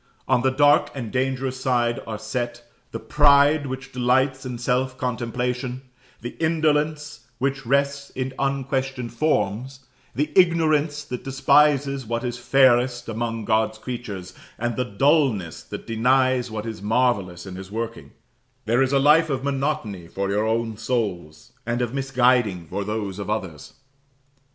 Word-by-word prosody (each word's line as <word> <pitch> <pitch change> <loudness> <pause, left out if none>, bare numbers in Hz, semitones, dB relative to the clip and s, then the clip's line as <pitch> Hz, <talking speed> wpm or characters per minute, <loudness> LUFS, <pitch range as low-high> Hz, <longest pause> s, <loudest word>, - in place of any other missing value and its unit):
On 125 - +3
the 130 - +3
dark 145 +2 +4
and 120 -5 -5
dangerous 130 0 -1
side 120 -2 +1
are 110 -1 -4
set, 120 +1 -4 0.3
the - - -4
pride 145 +4 +4
which 135 +1 -6
delights 130 +1 +1
in 125 -1 -5
self 130 +2 -1
contemplation 125 +1 -3 0.4
the 120 - -6
indolence 150 -5 0
which 135 0 -2
rests 140 +1 +1
in 130 0 -3
unquestioned 135 -2 -2
forms 130 -1 -1 0.3
the 150 +2 -1
ignorance 155 -4 +3
that 125 -4 -6
despises 140 0 +3
what 115 +1 -2
is 120 -1 -3
fairest 125 -2 +3
among 115 0 -3
God's 110 0 +1
creatures, 110 -6 -6 0.2
and 120 0 -2
the 125 - -1
dulness 125 - +1
that - - -8
denies 125 +2 +2
what 110 0 -5
is 110 -3 -6
marvellous 105 -6 0
in 95 -1 -8
His 95 0 -8
working: 115 +2 -5 0.6
there 120 +4 +2
is 135 0 +2
a - - +5
life 150 +4 +5
of 135 -2 -2
monotony 135 - -2
for 100 +3 -3
your 105 +2 +1
own 115 -1 -1
souls, 105 -10 -3
and 120 +1 -2
of 120 -1 -2
misguiding 125 -9 +2
for 100 +5 -4
those 105 -2 -4
of 100 - -5
others. 95 -9 -4
125 Hz, 145 wpm, -23 LUFS, 110-135 Hz, 0.6 s, a